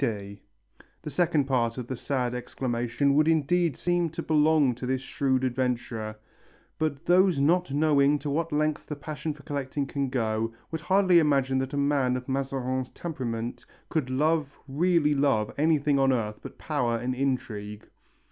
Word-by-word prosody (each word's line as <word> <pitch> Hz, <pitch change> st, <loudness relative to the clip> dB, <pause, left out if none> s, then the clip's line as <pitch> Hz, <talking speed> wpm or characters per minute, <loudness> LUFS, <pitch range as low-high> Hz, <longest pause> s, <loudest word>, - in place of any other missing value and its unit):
_" 100 Hz, -5 st, -3 dB, 0.6 s
The 150 Hz, -, -5 dB
second 160 Hz, -2 st, +2 dB
part 120 Hz, -3 st, 0 dB
of 125 Hz, -, -4 dB
the 130 Hz, -, -4 dB
sad 125 Hz, -1 st, -2 dB
exclamation 125 Hz, +2 st, -1 dB
would 155 Hz, +2 st, +3 dB
indeed 165 Hz, -1 st, +2 dB
seem 175 Hz, -1 st, +1 dB
to 165 Hz, -, -6 dB
belong 150 Hz, -3 st, +3 dB
to 125 Hz, +2 st, -6 dB
this 130 Hz, 0 st, -1 dB
shrewd 130 Hz, -1 st, 0 dB
adventurer, 120 Hz, -4 st, -2 dB, 0.6 s
but 155 Hz, -1 st, -2 dB
those 180 Hz, -3 st, +4 dB
not 175 Hz, +4 st, +2 dB
knowing 145 Hz, -1 st, +3 dB
to 145 Hz, 0 st, -5 dB
what 165 Hz, +3 st, -1 dB
lengths 155 Hz, 0 st, 0 dB
the 150 Hz, -, -6 dB
passion 155 Hz, +2 st, -5 dB
for 145 Hz, -, -16 dB
collecting 140 Hz, 0 st, -3 dB
can 140 Hz, 0 st, -2 dB
go, 115 Hz, -3 st, -1 dB, 0.2 s
would 160 Hz, -1 st, -4 dB
hardly 185 Hz, 0 st, +4 dB
imagine 135 Hz, -4 st, +2 dB
that 130 Hz, +2 st, -3 dB
a -, -, -2 dB
man 140 Hz, -3 st, +2 dB
of 125 Hz, -, -8 dB
Mazarin's 130 Hz, -1 st, -2 dB
temperament 120 Hz, -8 st, -5 dB, 0.3 s
could 155 Hz, -6 st, -1 dB
love, 150 Hz, +2 st, 0 dB
really 150 Hz, +1 st, +2 dB
love, 135 Hz, -7 st, +1 dB
anything 150 Hz, -2 st, +2 dB
on 135 Hz, 0 st, +4 dB
earth 105 Hz, -4 st, -2 dB
but -, -, -10 dB
power 125 Hz, -7 st, -1 dB
and 125 Hz, +2 st, -2 dB
intrigue. 125 Hz, -6 st, -3 dB
140 Hz, 165 wpm, -27 LUFS, 125-155 Hz, 0.6 s, those